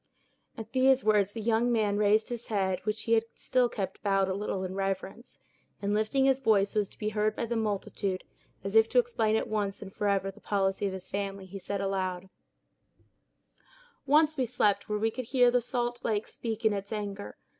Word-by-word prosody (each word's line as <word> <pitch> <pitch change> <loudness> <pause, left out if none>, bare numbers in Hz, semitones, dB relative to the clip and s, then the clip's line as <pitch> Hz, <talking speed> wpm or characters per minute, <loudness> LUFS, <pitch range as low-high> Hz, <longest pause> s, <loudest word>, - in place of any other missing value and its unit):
At 225 0 -8
these 265 0 +4
words 210 -2 +3
the 225 - -5
young 230 +2 +2
man 210 -3 +1
raised 210 +1 +3
his 240 -1 -5
head, 190 -4 0
which 215 +1 -2
he 230 - +1
had 225 0 +3
still 250 -2 +1
kept 195 -5 -4
bowed 195 -2 +2
a 190 - -1
little, 195 -1 -3
in 185 0 -4
reverence; 195 +4 -4 0.4
and 200 0 -1
lifting 220 +6 +2
his 270 -1 +3
voice 205 -6 +3
so 215 - +1
as 205 - -1
to - - -17
be 215 - -2
heard 215 0 0
by - - -2
the 235 +1 -3
multitude, 200 -3 -2 0.4
as 195 +1 -4
if 225 0 +5
to - - -1
explain 455 - +2
at - - 0
once 205 -2 -2
and 195 -1 -9
forever 200 -1 0
the 210 - -19
policy 195 0 0
of 190 - -3
his 190 -1 -7
family, 195 -1 -3
he 195 +1 -8
said 200 +1 -3
aloud: 190 -1 -2 1.8
"Once 305 +2 +4
we 255 -2 +1
slept 210 -4 +1
where 210 - 0
we 225 +1 +1
could 255 +2 -5
hear 245 0 +4
the 245 0 +3
salt 240 0 -2
lake 215 -1 -1
speak 225 -1 -5
in 215 - +4
its 200 +1 -5
anger. 205 -2 -5
210 Hz, 210 wpm, -29 LUFS, 195-230 Hz, 1.8 s, if